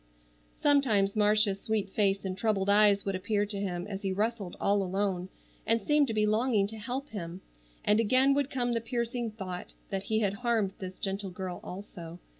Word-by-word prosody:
Sometimes 225 -9 +3
Marcia's 210 -1 +3
sweet 210 -3 -1
face 200 -1 +1
and 185 -1 -2
troubled 200 -1 +1
eyes 205 -1 +5
would 195 - -1
appear 205 +2 0
to 205 -1 -4
him 180 -3 -3
as 200 -1 -5
he 195 -2 -1
wrestled 210 -1 -2
all 200 0 +2
alone, 190 -1 -1 0.3
and 230 +1 +2
seemed 295 +6 +3
to 225 - -2
be 215 0 +3
longing 215 -1 +2
to 220 0 -8
help 255 +6 -4
him, 180 -3 -6 0.4
and 210 +1 +4
again 255 +5 +4
would 280 -1 +1
come 245 -3 -1
the 230 - 0
piercing 235 0 -2
thought 190 -4 -7 0.2
that 195 0 -2
he 220 +1 +1
had 200 -2 +1
harmed 220 -3 0
this 185 -1 -7
gentle 195 0 -2
girl 180 -1 -5
also. 175 -3 -8
205 Hz, 190 wpm, -30 LUFS, 195-225 Hz, 0.4 s, eyes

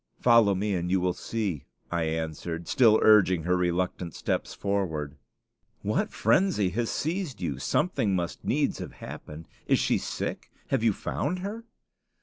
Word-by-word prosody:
"Follow 115 -5 +5
me 100 +2 -1
and 90 -1 -1
you 95 +1 +3
will 90 0 +1
see," 100 -8 -3 0.3
I 85 -2 0
answered, 80 +1 -3
still 115 -5 +5
urging 95 -6 +5
her 90 +2 +2
reluctant 90 -1 -1
steps - - -2
forward. 80 -8 -2 0.7
"What - - 0
frenzy 115 - +2
has 115 +5 -1
seized 165 -3 -2
you? 75 -7 -3
Something 110 - +1
must 85 -2 -3
needs - - 0
have - - -7
happened. 75 +2 -9 0.2
Is - - +4
she - - +1
sick? - - -4 0.2
Have 135 - +1
you 115 -1 +4
found 170 - -3
her?" 225 +3 -5
95 Hz, 150 wpm, -27 LUFS, 85-115 Hz, 0.7 s, Follow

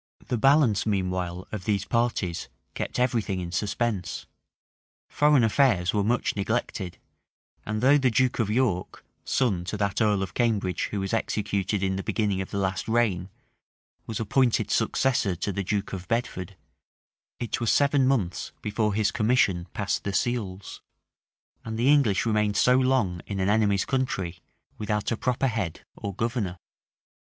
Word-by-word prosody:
The - - +1
balance, 135 -5 +4
meanwhile, 90 -3 -2
of 105 -3 -5
these 100 -2 0
parties, 115 -7 -1 0.2
kept - - -4
every 125 -2 +2
thing 95 -3 -3
in 85 -1 -5
suspense; 105 +1 -2 0.8
foreign 150 -4 +4
affairs 105 -7 +3
were 105 -1 +2
much 120 +4 0
neglected; 100 -3 -2 0.7
and 105 +1 -2
though 140 +3 +5
the 130 -2 +3
duke 125 +2 +1
of 110 -3 +1
York, 110 -6 -1 0.2
son 105 -10 +1
to 105 - -3
that 100 +1 -1
earl 105 -3 +2
of 95 -1 -6
Cambridge 105 -7 0
who 100 - -3
was 95 +3 -3
executed 100 -3 -1
in 95 0 0
the - - -2
beginning 100 -2 0
of 95 - -6
the - - -4
last 95 -1 -1
reign, 110 -6 +1 0.8
was 110 - -4
appointed 115 -1 +1
successor 115 -4 +1
to 100 +3 -3
the 100 - -2
duke 100 +1 -2
of 95 -1 -6
Bedford, 100 -5 -2 0.8
it 120 - -3
was 115 - +2
seven 140 -2 +3
months 105 -10 -1
before 105 -1 0
his 105 -1 +2
commission 105 -7 +2
passed 100 -1 -1
the 100 - -3
seals; 100 -3 -2 0.8
and 110 -1 -5
the 120 +4 +2
English 120 -10 +3
remained 105 -2 +1
so 125 - +5
long 130 -9 +2
in 100 -2 -3
an 95 +1 +1
enemy's 105 -2 +2
country, 95 -10 -2 0.4
without 105 0 -1
a - - +2
proper 125 +3 0
head 110 -10 -2
or 100 - -5
governor. 110 -5 -2
105 Hz, 160 wpm, -26 LUFS, 95-120 Hz, 0.8 s, though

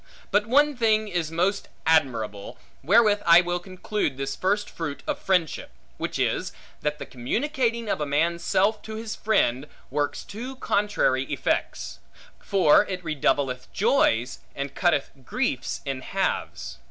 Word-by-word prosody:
But 210 +1 +2
one 290 +4 +4
thing 220 -2 +2
is 175 -5 -2
most 180 +5 0 0.2
admirable 115 -11 +1 0.2
(wherewith 205 - +4
I 170 +1 +7
will 175 0 -2
conclude 185 -4 -3
this 135 0 -3
first 200 +2 0
fruit 150 -4 -6
of 300 -2 -2
friendship), 180 - 0 0.3
which - - -3
is, - - -1 0.3
that 150 0 -1
this - - -7
communicating 235 - -1
of 155 - -1
a - - 0
man's 170 +4 0
self 205 +4 +2
to 220 - -7
his 220 0 -5
friend, 145 - +1 0.2
works 145 +1 -1
two 245 +6 -7
contrary 210 - +1
effects; - - -2 0.4
for 190 -6 +4
it 185 -2 -5
redoubleth 135 -4 0
joys, 185 - +2 0.2
and 140 0 -4
cutteth 160 -5 +1
griefs 190 - -2
in 135 -2 -3
halves. 60 - -3
180 Hz, 140 wpm, -25 LUFS, 145-215 Hz, 0.4 s, I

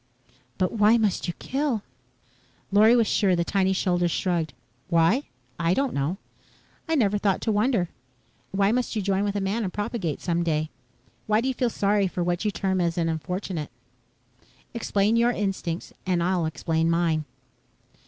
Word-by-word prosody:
"But 185 - +1
why 220 +1 +4
must 210 -5 0
you 175 - -2
kill?" 270 -6 -1 0.9
Lorry 215 +4 +6
was 235 -2 +4
sure 195 -3 +2
the 170 - +1
tiny 190 +1 +1
shoulders 175 -2 +1
shrugged. 170 -3 -1 0.4
"Why? 170 - +3 0.3
I 170 +2 +2
don't 275 -1 0
know. 140 +7 -1 0.7
I 325 - +2
never 210 -7 +2
thought 200 -2 +1
to 225 - 0
wonder. 210 -3 +2 0.6
Why 195 +1 +2
must 245 0 -1
you 210 - -1
join 195 0 +1
with 205 0 -1
a - - +1
man 200 +4 -1
and 190 - -2
propagate 205 - -3
some 170 -1 -1
day? 155 -2 -1 0.6
Why 215 0 +3
do 245 - -1
you 265 - +1
feel 245 -1 0
sorry 205 -2 +1
for 180 -1 -2
what 175 +2 -1
you 210 - +1
term 190 -2 -1
an 170 -1 0
unfortunate? 170 0 -3 1.0
Explain 220 -1 +1
your 235 +1 +4
instincts 190 -5 -3
and 180 -2 0
I'll 175 -2 +1
explain 160 +1 0
mine." 165 -2 +1
195 Hz, 165 wpm, -25 LUFS, 170-215 Hz, 1.0 s, Lorry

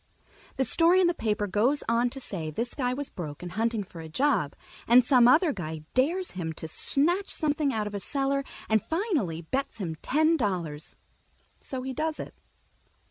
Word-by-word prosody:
The 265 - +1
story 340 +6 +4
in 370 - +4
the 345 - +3
paper 210 -7 -1
goes 220 +9 +1
on 235 +1 +2
to 270 - -6
say 170 -11 -5
this 230 +10 -3
guy 250 -3 -1
was 280 +2 -4
broke 155 -3 -7
and 175 - -6
hunting 225 0 0
for 175 -3 -11
a 160 - -9
job, 255 - +1 0.3
and 240 +1 +7
some 250 -3 +6
other 305 +4 +5
guy 160 -5 -6
dares 340 +9 +1
him 165 -3 -4
to 160 - -7
snatch 340 - +2
something 300 -2 0
out 215 -4 -1
of 210 - -5
a 200 - -3
cellar 275 +4 0 0.2
and 220 -1 +3
finally 310 - -1
bets 265 +12 -3
him 180 -6 -3
ten 315 +4 +2
dollars, 175 - -1 0.6
so 260 -2 -5
he 265 0 -4
does 310 +3 -2
it. - - -7
245 Hz, 190 wpm, -27 LUFS, 185-290 Hz, 0.6 s, and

